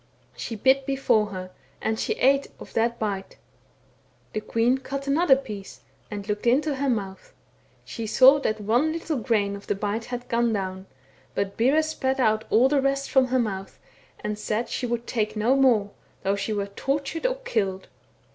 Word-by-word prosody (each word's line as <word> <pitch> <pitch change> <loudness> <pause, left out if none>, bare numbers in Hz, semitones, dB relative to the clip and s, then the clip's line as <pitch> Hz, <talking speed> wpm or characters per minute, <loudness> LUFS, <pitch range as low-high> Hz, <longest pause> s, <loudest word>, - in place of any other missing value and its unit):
She 230 - -5
bit 265 +5 +3
before 250 -6 +2
her, 185 -2 -7 0.3
and 220 0 -1
she - - 0
ate 275 +2 +3
of - - -11
that 235 +1 +1
bite; 200 -3 -4 1.0
the 215 - -2
queen 230 +4 +1
cut 275 +1 -5
another 280 +1 +4
piece, 215 -8 -8 0.3
and 205 -1 -6
looked 210 +2 -2
into 280 +3 +2
her 275 0 0
mouth; 195 -5 -4 0.5
she 225 -1 -5
saw 265 +5 +7
that 215 -6 -1
one 240 +9 +2
little 325 -2 -2
grain 210 -4 0
of 200 - -11
the - - 0
bite 210 +3 -2
had 245 0 -6
gone 235 -1 +1
down, 190 -1 -4 0.5
but 200 0 -1
Bera 275 +7 +3
spat 270 -4 -1
out 220 -3 +2
all 240 +4 +5
the 280 0 +2
rest 275 0 0
from 265 -1 +4
her 255 +1 +1
mouth, 195 -5 -3 0.4
and 210 0 -3
said 220 +2 -2
she 250 - -2
would 240 0 -2
take 215 -3 -1
no 225 +5 +2
more, 235 -7 +3 0.3
though 195 +1 +1
she 200 +2 -3
were 205 -2 -1
tortured 275 - -2
or - - -1
killed. 200 - -2
235 Hz, 180 wpm, -25 LUFS, 210-270 Hz, 1.0 s, saw